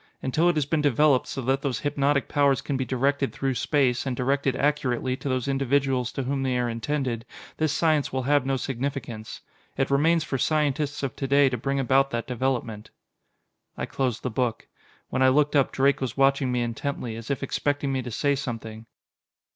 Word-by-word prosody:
Until 155 +6 +2
it 175 - +1
has 150 -3 +1
been 155 +1 0
developed 145 -1 +3
so 135 - -5
that 135 +2 +1
those 135 -6 -2
hypnotic 145 -1 +1
powers 140 -3 +2
can 140 - -3
be 130 - 0
directed 135 +3 0
through 135 -1 -1
space, 130 -1 +1
and 130 -2 -2
directed 135 +1 +1
accurately 135 -3 0
to 140 - -5
those 130 0 -1
individuals 135 -2 +1
to 135 - -2
whom 135 +1 -1
they 130 -2 0
are 120 -1 0
intended, 120 0 -2 0.3
this 155 -2 +1
science 155 -2 +1
will 130 0 -2
have 145 +1 +3
no 135 0 0
significance. 125 -4 -5 0.4
It 135 0 0
remains 160 +4 +3
for 135 -4 -3
scientists 145 -1 0
of 135 -4 -2
to 135 - -2
day 140 0 +5
to 125 - -2
bring 135 +4 -1
about 135 +1 +3
that 120 -3 -3
development." 120 -4 -2 0.9
I - - -2
closed 130 -4 -2
the 125 - -2
book. 120 0 -2 0.4
When 130 - -1
I 130 - +6
looked 145 +2 +2
up, 140 -2 +3
Drake 135 +1 +2
was 130 -2 -3
watching 135 -1 +3
me 125 -1 0
intently, 120 0 -4
as 115 0 -8
if 140 -1 -2
expecting 145 +1 -1
me 130 - 0
to 125 - -6
say 140 +5 +1
something. 115 -4 -5
135 Hz, 195 wpm, -25 LUFS, 125-140 Hz, 0.9 s, I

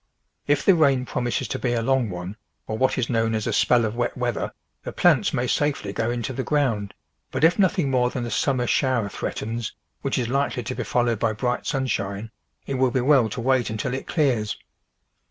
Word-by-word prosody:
If 145 -1 +2
the 195 - +7
rain 140 -6 +3
promises 120 -2 -2
to - - -3
be 120 -2 0
a 115 -1 0
long 130 -2 +2
one, 90 +2 -6 0.3
or 110 - -3
what 130 +4 +1
is 125 -2 0
known 115 -2 +1
as 110 - -2
a - - -1
spell 120 -2 +3
of 110 +1 -3
wet 120 +1 -1
weather, 120 -2 -2 0.3
the - - -6
plants - - +3
may 120 - 0
safely 140 -6 0
go 115 +2 -1
into 120 +2 -2
the 130 - -2
ground, 120 -10 0 0.3
but - - -3
if 165 +5 +5
nothing 180 -7 +2
more 125 -1 +2
than 125 -1 -4
a 120 - -5
summer 130 -3 +1
shower 125 -5 +1
threatens, 115 +3 -4 0.3
which 135 - -1
is 125 -3 0
likely 135 -1 0
to 125 - -4
be - - -3
followed 120 -3 +1
by 115 -1 +1
bright 125 +3 -2
sunshine, 110 -6 -2 0.3
it 135 -2 -3
will 130 -1 +4
be 130 - 0
well 130 -4 +4
to 125 +3 -5
wait 130 -1 +2
until 110 +3 -3
it 135 - -4
clears. 125 -10 +1
125 Hz, 210 wpm, -24 LUFS, 115-135 Hz, 0.3 s, the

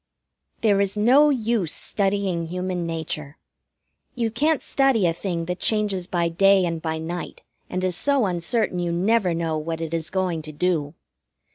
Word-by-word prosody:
There 205 -3 +3
is 200 +1 0
no 260 +8 +5
use 225 - 0
studying 195 -4 0
Human 180 0 -3
Nature. 155 -3 -4 0.8
You 230 -2 -1
can't 300 +6 +1
study 270 -8 +2
a 165 - +2
thing 170 -1 -3
that 180 +1 -4
changes 205 -5 0
by 175 -2 0
day 195 +3 +4
and 165 -2 -3
by 160 -1 -2
night, 170 +2 -6 0.3
and 185 0 -3
is 180 -2 0
so 280 -1 +2
uncertain 185 +2 0
you 175 -1 -1
never 185 +1 +1
know 165 -2 -1
what 160 +1 -4
it 165 0 -4
is 165 -1 -1
going 185 -4 -1
to 155 0 -9
do. 155 -1 -1
180 Hz, 165 wpm, -23 LUFS, 165-210 Hz, 0.8 s, no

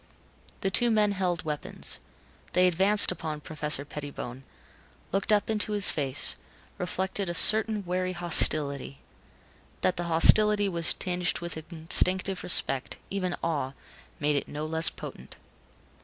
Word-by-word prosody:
The 195 - -2
two 240 +4 +6
men 210 -2 +1
held 180 -4 -3
weapons. 150 -1 -3 0.5
They 180 0 +3
advanced 195 +4 +3
upon 155 -4 -7
Professor 150 -2 -2
Pettibone, 140 -4 -9 0.7
looked 195 +3 -1
up 210 -1 +1
into 215 -1 +1
his 205 -2 +6
face, 135 -4 +1 0.4
reflected 190 +1 -4
a 175 - -4
certain 215 +1 +3
wary 185 +1 -3
hostility. 150 -5 +3 0.8
That 185 - -1
the 175 - -4
hostility 205 +5 +5
was 170 -3 +1
tinged 180 -1 -3
with 170 -1 -5 0.2
instinctive 185 +3 0
respect, 135 -6 0
even 185 -3 -3
awe, 145 -5 -3 0.5
made 150 0 -1
it 140 - -3
no 150 +1 -6
less 160 +1 +2
potent. - - -11
175 Hz, 130 wpm, -26 LUFS, 155-195 Hz, 0.8 s, two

